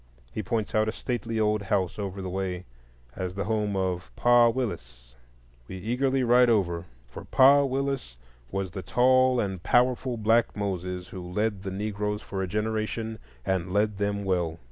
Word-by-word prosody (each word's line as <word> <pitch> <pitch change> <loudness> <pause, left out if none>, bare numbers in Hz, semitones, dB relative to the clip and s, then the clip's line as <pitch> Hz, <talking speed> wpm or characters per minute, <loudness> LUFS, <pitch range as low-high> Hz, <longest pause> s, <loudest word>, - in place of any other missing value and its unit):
He 110 - -3
points 110 +2 -2
out 110 0 +2
a - - 0
stately 115 -1 -3
old 105 -1 +2
house 95 -1 -1
over 95 -1 -4
the - - -4
way 90 -1 -3 0.5
as 90 0 -4
the 100 - -2
home 105 -1 -1
of 95 -1 -2
"Pa 120 -1 +5
Willis." 60 - -5 0.5
We 95 - -7
eagerly 130 +6 0
ride 125 0 +5
over, 90 -6 +1 0.2
for - - -9
"Pa 140 +2 +6
Willis" 135 - -2 0.3
was 95 -2 -3
the 95 - -5
tall 130 +5 +3
and 95 -4 -2
powerful 125 +3 +2
black 115 +1 +2
Moses 90 -2 -3
who 95 - -7
led 105 0 -1
the 95 - -4
Negroes 105 +1 -3
for 95 -1 -4
a 95 - -1
generation, 110 +2 -2 0.3
and 95 -1 -1
led 105 0 +1
them 100 0 -1
well. 90 -4 0
105 Hz, 165 wpm, -27 LUFS, 95-115 Hz, 0.5 s, Pa